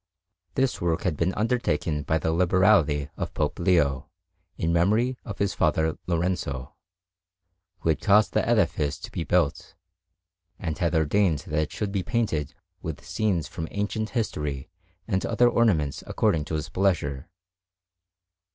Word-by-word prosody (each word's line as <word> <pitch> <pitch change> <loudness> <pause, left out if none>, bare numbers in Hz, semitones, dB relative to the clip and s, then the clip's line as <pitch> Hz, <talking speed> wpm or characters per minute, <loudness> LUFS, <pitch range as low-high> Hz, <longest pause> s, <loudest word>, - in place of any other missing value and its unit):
This 130 -1 0
work 85 +1 0
had 90 -6 0
been 85 +5 +1
undertaken 105 -9 0
by 80 +2 0
the 80 +1 -1
liberality 85 -5 +3
of - - -4
Pope - - -1
Leo, 85 -7 +2 0.5
in 85 +1 0
memory 110 +9 +2
of 105 -4 -7
his 100 -1 0
father 80 -1 +1
Lorenzo, 85 -7 -2 1.1
who 80 - 0
had 80 - +1
caused 105 +1 +4
the - - +2
edifice 85 -10 +1
to - - -9
be 85 - -3
built, 85 -3 0 0.8
and 80 -4 -3
had 85 -1 +1
ordained 80 0 +2
that 75 0 0
it 75 - -3
should 105 -2 -3
be 100 -1 0
painted 90 - -1 0.3
with - - -6
scenes 100 -7 0
from 80 -2 -5
ancient 105 +2 -2
history 75 - -3 0.4
and 95 - 0
other 120 - +3
ornaments 95 - +2
according 75 -3 +1
to 80 - -3
his 75 - -3
pleasure. 85 -6 0
85 Hz, 145 wpm, -26 LUFS, 75-100 Hz, 1.1 s, caused